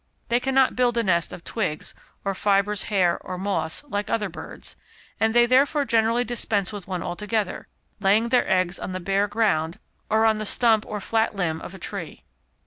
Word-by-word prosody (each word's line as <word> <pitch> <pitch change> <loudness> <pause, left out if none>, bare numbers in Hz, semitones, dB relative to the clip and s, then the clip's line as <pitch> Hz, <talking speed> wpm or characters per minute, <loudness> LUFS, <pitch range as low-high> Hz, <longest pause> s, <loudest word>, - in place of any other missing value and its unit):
They 240 +1 +3
cannot 265 0 +2
build 245 -1 +2
a 235 - +2
nest 170 -4 +1
of 170 - -9
twigs 185 -9 -3 0.3
or 195 - 0
fibres, 200 +1 +1
hair 185 -4 +2
or 185 - -6
moss, 180 - -2
like 205 -7 -3
other 210 -3 0
birds, 170 - -10 0.4
and 220 0 +3
they 240 +1 +5
therefore 280 +4 +3
generally 230 0 +2
dispense 220 -5 -2
with 200 -3 -7
one 180 -3 -3
altogether, 210 +3 -3 0.3
laying 210 +4 +3
their 250 0 +2
eggs 185 -1 +1
on 185 - -5
the 185 - -3
bare 195 +3 +1
ground, 195 -7 0 0.3
or 220 +1 +3
on 220 -1 +3
the - - -2
stump 225 -2 +2
or 210 -1 -4
flat 225 +1 0
limb 165 -4 -1
of 190 - -8
a - - -8
tree. 170 - -7
210 Hz, 190 wpm, -24 LUFS, 185-230 Hz, 0.4 s, they